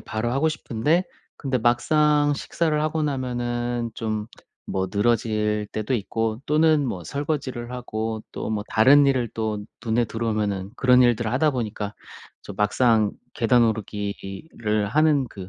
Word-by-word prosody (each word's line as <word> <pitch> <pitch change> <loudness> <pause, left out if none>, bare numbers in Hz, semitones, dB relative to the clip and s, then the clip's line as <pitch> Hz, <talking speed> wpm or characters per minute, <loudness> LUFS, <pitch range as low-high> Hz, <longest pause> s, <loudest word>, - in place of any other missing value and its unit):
바로 110 +2 -3
하고 140 +5 +2
싶은데 155 +3 0 0.3
근데 135 -3 -1
막상 145 +5 +3
식사를 155 +2 -1
하고 155 0 -1
나면은 120 -3 -2
좀 110 -2 -3 0.4
뭐 95 0 -1
늘어질 105 -1 +1
때도 110 +4 -1
있고 115 +1 -2
또는 155 -1 +3
뭐 95 -7 -4
설거지를 130 - -3
하고 110 -3 -4
또 - - -4
뭐 105 -1 -1
다른 140 +6 +6
일을 125 -4 +1
또 110 -2 -3 0.2
눈에 115 +1 +1
들어오면은 105 -3 -2
그런 125 0 +5
일들을 120 -2 +2
하다 150 +4 +2
보니까 110 -4 -4 0.5
좀 100 - -9
막상 105 +1 +3 0.2
'계단 120 0 +3
오르기를 105 +1 -3
하는 150 +2 +3
그 95 -4 -9
120 Hz, 285 characters per minute, -24 LUFS, 110-135 Hz, 0.5 s, 다른